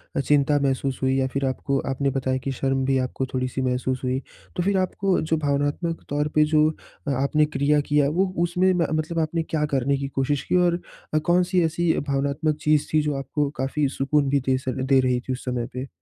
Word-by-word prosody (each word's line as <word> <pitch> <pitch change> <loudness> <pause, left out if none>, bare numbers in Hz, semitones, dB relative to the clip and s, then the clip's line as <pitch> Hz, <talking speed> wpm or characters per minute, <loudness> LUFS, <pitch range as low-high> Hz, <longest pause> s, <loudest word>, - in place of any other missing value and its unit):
अ, - - +1
चिंता 145 +1 +3
महसूस 135 -1 -1
हुई 130 0 +2
या 130 - +1
फिर 140 0 0
आपको 135 +1 -1
आपने 135 +1 0
बताया 130 -1 -1
कि 135 - -2
शर्म 135 0 -1
भी 135 0 +2
आपको 130 +1 -2
थोड़ी-सी 130 0 -2
महसूस 130 0 -1
हुई? 130 +1 0 0.4
तो 175 - 0
फिर 195 +1 +1
आपको 185 +1 0
जो 160 0 0
भावनात्मक 145 +3 -1
तौर 145 +1 0
पे 155 - +6
जो 155 0 +5 0.4
अ, 140 - +1
आपने 140 +3 +2
क्रिया 150 0 +1
किया, 145 -1 +4
वो 185 +6 +1 0.2
उसमें 180 +2 +2
म 170 -3 +1
मतलब 165 +2 -4
आपने 160 +1 0
क्या 155 -2 -1
करने 135 +2 +1
की 135 0 -3
कोशिश 135 +1 -1
की? - - -1
और 175 -1 +3 0.3
अ, 155 - +3
कौन 180 +1 +4
सी 180 0 +1
ऐसी 170 +1 +1 0.2
भावनात्मक 140 +3 0
चीज़ 150 -1 +2
थी 155 - +4
जो 150 -1 -1
आपको 140 +1 -1
काफ़ी 140 +2 0
सुकून 140 +1 +2
भी 140 +1 +3
दे 130 - +3
सक 130 -1 -4
दे 135 - +6
रही 125 -1 +2
थी 130 - -3
उस 130 - -7
समय 125 -2 -2
पे? 130 +2 -5
140 Hz, 220 wpm, -24 LUFS, 135-155 Hz, 0.4 s, पे